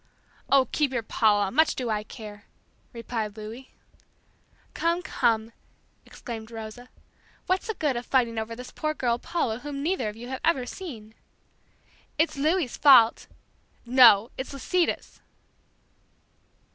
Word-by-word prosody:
"Oh, 270 -2 +4
keep 295 -3 +1
your 240 -3 -2
Paula, 205 -3 +2
much 315 +5 +3
do 245 -3 -3
I 210 -1 0
care!" 210 -1 -11 0.5
replied 225 -3 -5
Louis. 225 +5 -9 1.0
"Come, 340 +2 0
come," 225 -6 0 0.5
exclaimed 225 -2 -8
Rosa, 225 +2 -9 0.6
"what's 375 +3 0
the 445 - -3
good 295 -4 0
of 240 - -3
fighting 235 -4 +1
over 220 +1 -5
this 250 +1 -9
poor 310 -1 -3
girl 240 -3 0
Paula 240 -9 -2
whom 280 0 -6
neither 325 - 0
of 210 - -9
you 235 +2 -9
have 260 - -5
ever 275 -7 +2
seen!" 240 - -9 1.0
"It's 320 +2 +1
Louis' 305 -1 0
fault!" 250 -6 +6 0.6
"No, 235 -3 +6
it's 260 - -5
Lisita's!" 340 +5 -1
245 Hz, 135 wpm, -26 LUFS, 220-290 Hz, 1.0 s, fault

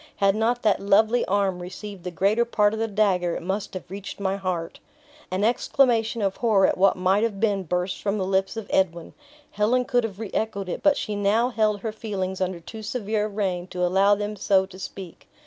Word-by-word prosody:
Had 195 0 +2
not 235 +3 0
that 215 -2 +3
lovely 215 +4 +3
arm 195 -2 0
received 185 +1 -8
the 180 - -3
greater 200 +6 +2
part 210 -3 +2
of 220 - -3
the 225 - 0
dagger, 195 -5 +1
it - - -5
must 195 +2 -3
have 185 - -5
reached 200 +1 -7
my 195 -1 0
heart." 180 -4 -4 0.5
An 185 +2 -1
exclamation 235 -1 +2
of 195 -1 -1
horror 210 -5 +3
at - - +2
what 195 +1 +4
might 185 +2 +2
have 220 -3 -1
been 205 -3 +1
burst 180 +1 -2
from 205 0 -1
the 190 - -1
lips 195 +3 0
of 225 - -4
Edwin. 170 -3 0 0.4
Helen 235 +5 +1
could 245 0 +1
have 210 -3 -5
re 220 -3 -5
echoed 200 -4 -2
it, - - -4
but 295 -1 +4
she 210 - -3
now 205 +4 +2
held 215 -4 0
her 220 - -3
feelings 190 -4 -4
under 185 -1 -1
too 220 +6 -9
severe 215 -1 -2
a - - -3
rein 190 -4 -2
to 180 -1 -1
allow 195 +3 +4
them 205 +1 -4
so 190 -1 +2
to 190 -1 -13
speak. 190 -2 -9
200 Hz, 215 wpm, -24 LUFS, 190-220 Hz, 0.5 s, what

